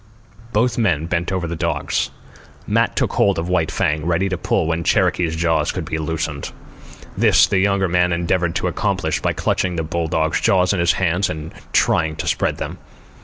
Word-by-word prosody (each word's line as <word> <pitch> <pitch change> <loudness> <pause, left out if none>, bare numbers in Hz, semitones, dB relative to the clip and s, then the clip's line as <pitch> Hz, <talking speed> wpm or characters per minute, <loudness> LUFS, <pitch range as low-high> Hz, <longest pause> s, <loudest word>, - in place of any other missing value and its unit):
Both 115 +3 +1
men 85 -9 +1
bent 85 +2 -1
over 95 -2 -1
the 85 - -4
dogs. - - -1 0.6
Matt - - +1
took - - 0
hold 100 -1 +2
of 85 +2 -3
White 85 -3 +1
Fang, 75 -1 0
ready 85 +4 0
to 90 - -1
pull 90 0 0
when 85 +1 -1
Cherokee's 85 0 +1
jaws 80 -2 +1
should 90 -4 -3
be 80 0 -3
loosened. 80 -2 -3 0.6
This - - +5
the 100 - +1
younger 100 0 +2
man 90 0 +2
endeavoured 85 0 0
to - - 0
accomplish - - -1
by - - 0
clutching 90 -2 -1
the 80 - -1
bulldog's 80 0 -1
jaws 90 0 +3
in 100 - -1
his 85 0 +3
hands 95 +1 0
and 80 0 -6 0.2
trying 80 -1 +2
to - - -5
spread - - 0
them. - - -6
85 Hz, 185 wpm, -20 LUFS, 80-95 Hz, 0.6 s, This